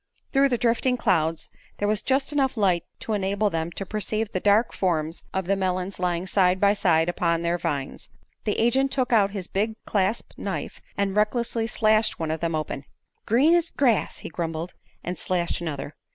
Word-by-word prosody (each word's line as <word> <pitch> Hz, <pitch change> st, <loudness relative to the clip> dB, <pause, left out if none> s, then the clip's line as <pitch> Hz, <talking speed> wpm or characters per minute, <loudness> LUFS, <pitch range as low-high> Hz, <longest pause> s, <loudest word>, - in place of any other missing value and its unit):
Through 275 Hz, 0 st, +4 dB
the 245 Hz, -, +1 dB
drifting 245 Hz, +2 st, +1 dB
clouds 165 Hz, -8 st, 0 dB, 0.3 s
there 205 Hz, -, 0 dB
was 210 Hz, 0 st, +1 dB
just 270 Hz, +2 st, +1 dB
enough 270 Hz, -4 st, +1 dB
light 185 Hz, -5 st, +2 dB, 0.2 s
to 220 Hz, -, -2 dB
enable 200 Hz, +1 st, 0 dB
them 165 Hz, 0 st, -2 dB
to 195 Hz, -, -4 dB
perceive 215 Hz, +1 st, -2 dB
the 185 Hz, -, -1 dB
dark 205 Hz, +4 st, +3 dB
forms 165 Hz, -3 st, -1 dB
of 190 Hz, -1 st, -2 dB
the 195 Hz, +2 st, +2 dB
melons 185 Hz, 0 st, -2 dB
lying 180 Hz, 0 st, 0 dB
side 185 Hz, -1 st, +2 dB
by 200 Hz, +1 st, +4 dB
side 170 Hz, -5 st, +2 dB
upon 170 Hz, -1 st, 0 dB
their 170 Hz, +1 st, 0 dB
vines. 140 Hz, -4 st, -4 dB, 0.3 s
The 210 Hz, -, -1 dB
agent 265 Hz, +4 st, +3 dB
took 255 Hz, -2 st, 0 dB
out 205 Hz, -3 st, +5 dB
his 195 Hz, -3 st, -5 dB
big 215 Hz, +3 st, -1 dB
clasp 205 Hz, +2 st, 0 dB
knife -, -, -4 dB, 0.2 s
and 200 Hz, -1 st, 0 dB
recklessly 225 Hz, +2 st, +1 dB
slashed 215 Hz, -1 st, +2 dB
one 160 Hz, -1 st, -1 dB
of 160 Hz, -, -2 dB
them 165 Hz, 0 st, -1 dB
open. 150 Hz, -3 st, -4 dB, 0.4 s
"Green's 320 Hz, +9 st, +4 dB
grass!" 245 Hz, -7 st, +1 dB
he -, -, -4 dB
grumbled, 165 Hz, +1 st, -4 dB, 0.3 s
and 180 Hz, -1 st, -4 dB
slashed 175 Hz, -2 st, -1 dB
another. 150 Hz, -3 st, -4 dB
195 Hz, 180 wpm, -25 LUFS, 170-225 Hz, 0.4 s, out